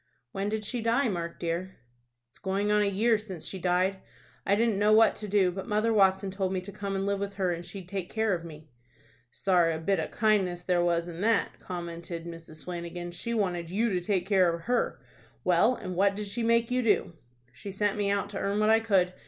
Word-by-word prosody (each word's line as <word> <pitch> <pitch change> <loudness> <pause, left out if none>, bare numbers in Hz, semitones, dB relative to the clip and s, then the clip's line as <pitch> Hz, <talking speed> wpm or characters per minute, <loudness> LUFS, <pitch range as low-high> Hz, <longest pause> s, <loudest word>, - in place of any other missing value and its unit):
"When 195 +1 -2
did 215 0 -3
she 240 +3 -3
die, 235 +3 +2
Mark 170 -3 -4
dear?" 175 +2 -3 0.6
"It's - - -14
going 200 +1 0
on 210 0 +4
a - - +3
year 220 +3 +2
since 190 -7 -8
she 190 - -5
died. 185 +2 +1 0.5
I 200 - +4
didn't 220 -2 +1
know 210 +1 +4
what 220 +1 +6
to 210 - -5
do, 195 -2 +3
but 190 +4 -6
Mother 215 +1 +1
Watson 190 -1 +3
told 190 -1 -2
me 185 - -1
to 195 +2 -9
come 200 -1 -4
and 195 0 -1
live 200 0 0
with 200 0 -3
her, 190 -3 0
and 170 0 -6
she'd 190 0 -9
take 190 -1 -4
care 220 -2 +1
of 170 -2 -3
me." 155 -2 -11 0.6
"Sorra 170 +5 +2
a - - -4
bit 190 +3 +1
of 155 - -2
kindness 195 -5 +1
there 175 -1 +2
was 170 0 +1
in 170 0 -7
that," 220 -2 +1
commented 170 -1 -6
Mrs. 165 -2 -10
Flanagan. 175 0 -5
"She 235 +7 -4
wanted 175 -6 -1
you 220 +6 +1
to 180 -3 0
take 180 0 0
care 190 -3 +4
of 170 0 -5
her. 245 +5 0 0.4
Well, 185 +8 +4
and 185 -6 -6
what 200 +2 +3
did 210 +1 -4
she 205 +4 -4
make 230 +1 +2
you 250 0 +2
do?" 210 -6 +1 0.4
"She 200 - -8
sent 205 +1 0
me 205 -1 0
out 200 0 -1
to 200 - -4
earn 200 +1 0
what 215 +1 +4
I 225 - +6
could. 190 -5 +2
195 Hz, 230 wpm, -28 LUFS, 175-210 Hz, 0.6 s, what